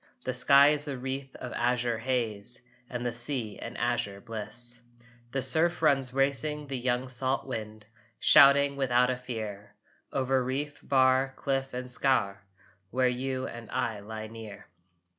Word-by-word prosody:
The - - -1
sky 140 +1 +6
is 150 0 +2
a 140 -2 -3
wreath 135 +1 -5
of 125 - -7
azure 120 -1 0
haze 120 -2 -2 0.3
And 125 -1 -4
the 120 - -1
sea 120 -3 -2
an - - -7
azure 120 -5 -1
bliss. 120 +2 -3 0.5
The 135 +1 0
surf 160 +6 +2
runs 135 -4 +3
racing 140 +3 0
the 135 -1 -4
young 125 +1 -1
salt 130 +1 -1
wind, 110 -4 -6 0.3
Shouting 140 0 +6
without 125 -2 +3
a - - -1
fear 110 -5 -7 0.4
Over 130 -1 +1
reef, 145 +3 -3
bar, 130 0 +3
cliff 135 -2 -2
and 125 0 -4
scaur, 125 -6 +1 0.5
Where 130 +3 +2
you 130 +1 -3
and 115 -2 -8
I 120 -4 -2
lie 110 +1 -7
near. 110 -2 -10
125 Hz, 150 wpm, -28 LUFS, 120-135 Hz, 0.5 s, sky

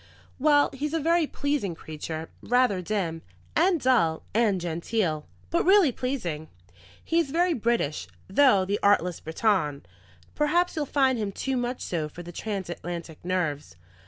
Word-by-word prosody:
"Well, 290 +1 +4
he's 295 +4 -3
a - - +1
very 330 +1 +2
pleasing 285 - -2
creature, 160 +1 -6
rather 245 -6 +2
dim, 175 -4 -2 0.3
and 345 +1 +3
dull, 170 - +2
and 215 -4 +2
genteel, 170 -1 -2 0.2
but 340 - +2
really 380 -6 +5
pleasing. 180 - -3 0.6
He 335 - +2
is 325 -5 0
very 345 +4 +2
British, 220 - -1 0.2
though, 200 -3 +4
the 200 +2 -1
artless 180 -4 +3
Briton! 160 - 0 0.5
Perhaps 345 +5 +1
you'll 300 -3 -2
find 265 -4 +2
him 205 -2 -2
too 265 +6 -2
much 245 0 -2
so 160 -4 -2
for 175 +3 -10
the 175 - -9
transatlantic 175 -4 -5
nerves. 160 - -2
210 Hz, 145 wpm, -26 LUFS, 170-285 Hz, 0.6 s, really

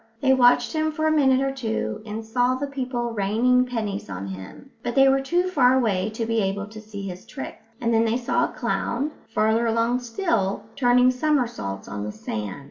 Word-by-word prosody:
They 265 +1 +4
watched 245 +3 +4
him 315 0 0
for 315 +1 -2
a 315 - +3
minute 270 -4 +4
or 270 0 0
two, 225 -5 -3
and 220 +1 -5
saw 245 +3 +1
the 275 +2 -2
people 255 -4 -3
raining 235 +5 +2
pennies 215 - -3
on 95 0 -5
him, 95 - -9
but 240 -1 -3
they 270 0 +6
were 270 0 +4
too 345 +6 +1
far 260 -8 +4
away 210 -5 +1
to 230 - -2
be 230 0 0
able 195 0 -1
to 215 0 -10
see 210 -2 -8
his 180 0 -7
tricks; 270 - -8 0.2
and 230 -1 0
then 225 0 +4
they 225 +1 +1
saw 245 - +1
a - - -5
clown, 275 +6 -2 0.2
farther 225 +1 +2
along 230 +2 +1
still, 230 - -1
turning 250 -1 +4
somersaults 245 - -1
on 100 0 -5
the 105 - -4
sand. 105 +2 -5
240 Hz, 205 wpm, -24 LUFS, 210-265 Hz, 0.2 s, they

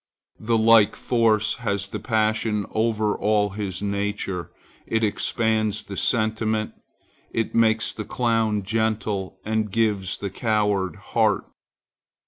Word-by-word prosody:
The 115 +1 +1
like 110 -2 +5
force 110 -3 +1
has 100 -4 -1
the - - -5
passion 110 -2 0
over 110 -1 +1
all 105 -1 +1
his 100 -1 -4
nature. 100 -3 -2 0.4
It 115 0 0
expands 110 0 0
the 100 - -8
sentiment; 110 +1 0 0.6
it 115 - -2
makes 110 -1 +2
the 110 - -5
clown 115 -3 0
gentle 110 -2 -1
and 110 0 0
gives 105 -4 0
the 100 -2 -5
coward 105 -4 0
heart. - - 0
110 Hz, 115 wpm, -24 LUFS, 100-110 Hz, 0.6 s, like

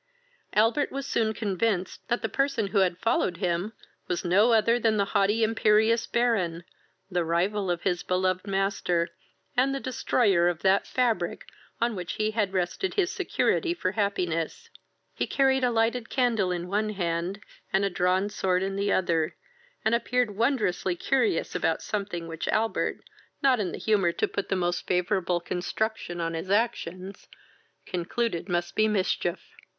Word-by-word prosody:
Albert 225 +7 +2
was 275 0 -4
soon 225 -5 +1
convinced 200 -2 -1
that 240 0 -1
he - - +1
person 275 -2 0
who 200 - +2
had 180 -2 +2
followed 185 -4 0
him 180 +2 -1 0.4
was 180 - -2
no 200 +7 +4
other 230 +1 +4
than 220 -2 +2
the 200 - +2
haughty 210 +2 +3
imperious 220 +1 +3
Baron, 195 -9 0 0.5
the 175 -1 +1
rival 185 +4 0
of 175 -1 -1
his 180 -2 0
beloved 185 +1 0
master, 195 -3 0 0.5
and 270 +2 +2
the - - -2
destroyer 215 -8 +2
of 175 -2 -2
that 195 +1 +3
fabric 230 -9 0 0.3
on 235 -1 +1
which 175 -3 -4
he 215 0 0
had 210 -3 0
rested 190 - -1
his 380 -3 +1
security 345 -1 0
for 185 - -1
happiness. 200 - -2 0.4
He - - -2
carried 265 -1 +2
a 250 - +4
lighted 230 +1 0
candle 230 -8 +1
in 175 0 -3
one 210 +3 0
hand, 175 -1 -2 0.3
and 195 +1 +2
a - - +1
drawn 185 +3 +1
sword 185 -2 0
in 195 0 -2
the 200 0 0
other, 165 -3 +1 0.5
and 220 - +3
appeared 240 -2 +1
wondrously 215 -6 +1
curious 270 - 0
about - - 0
something 195 -5 -3
which 165 -1 -5
Albert, 225 +1 0 0.4
not 260 -3 +4
in 190 -4 -1
the - - -5
humour 195 -6 +2
to - - 0
put 200 - -4
the 195 - +1
most 175 -1 -1
favourable 180 -1 +1
construction 180 +1 -3
on 165 0 -2
his 165 +3 -5
actions, 195 -3 -1 0.6
concluded 180 +1 -2
must 175 -1 -1
be 215 0 +4
mischief. 190 -3 0
200 Hz, 160 wpm, -27 LUFS, 180-225 Hz, 0.6 s, no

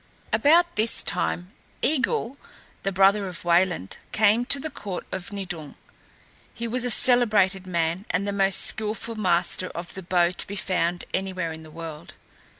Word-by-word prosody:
About 330 +10 +4
this 220 +2 +2
time 180 +2 0 0.3
Eigil, 260 -3 0 0.5
the 195 - -1
brother 195 +2 +4
of 180 -1 -9
Wayland, 175 - +1
came 220 +3 +3
to 280 +2 +3
the 315 +2 -5
court 195 -3 -5
of 185 0 -6
Nidung. 175 -7 -6 0.8
He 235 - -5
was 245 +2 -2
a 245 - 0
celebrated 210 -7 +3
man 170 +2 -1
and 185 +4 -1
the - - 0
most 195 -1 +3
skilful 220 +1 -1
master 185 -3 +1
of 170 +1 -6
the 190 - -7
bow 175 -1 +2
to 180 - -2
be 200 - -6
found 180 -3 -1
anywhere 185 -3 -2
in 160 - -10
the 160 - -13
world. 160 -1 -9
195 Hz, 160 wpm, -25 LUFS, 175-220 Hz, 0.8 s, About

